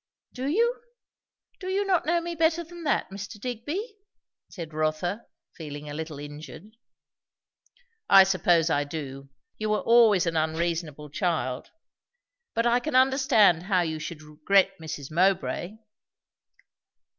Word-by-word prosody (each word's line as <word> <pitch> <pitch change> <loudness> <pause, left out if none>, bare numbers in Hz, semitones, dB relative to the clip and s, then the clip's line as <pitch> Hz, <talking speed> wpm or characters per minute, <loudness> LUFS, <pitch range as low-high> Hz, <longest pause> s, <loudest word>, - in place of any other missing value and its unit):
"Do 260 +1 -4
you? 465 - +1 0.8
Do 370 - -7
you 390 +2 0
not 365 -5 +1
know 340 +1 +2
me 340 0 -4
better 330 +1 +1
than 340 0 -11
that, 280 - 0
Mr. 200 +2 -8
Digby?" 295 - -5 0.5
said 165 -5 -8
Rotha, 155 +7 -2 0.3
feeling 150 -2 -8
a 145 - -6
little 155 -1 -6
injured. 150 +8 -10 1.3
"I 195 -1 +9
suppose 175 -3 +2
I 145 -1 +2
do! 140 -2 -7 0.3
You 215 0 -2
were 215 - +1
always 225 -6 +5
an 165 -1 -1
unreasonable 160 -2 -2
child. 150 -7 -2 0.9
But 230 - +1
I 240 +1 +3
can 305 +2 -4
understand 255 - +4
how 185 0 +1
you 160 -2 -2
should 155 0 -7
regret 165 +6 +2
Mrs. 150 -3 -7
Mowbray." 180 +1 0
185 Hz, 135 wpm, -26 LUFS, 155-255 Hz, 1.3 s, I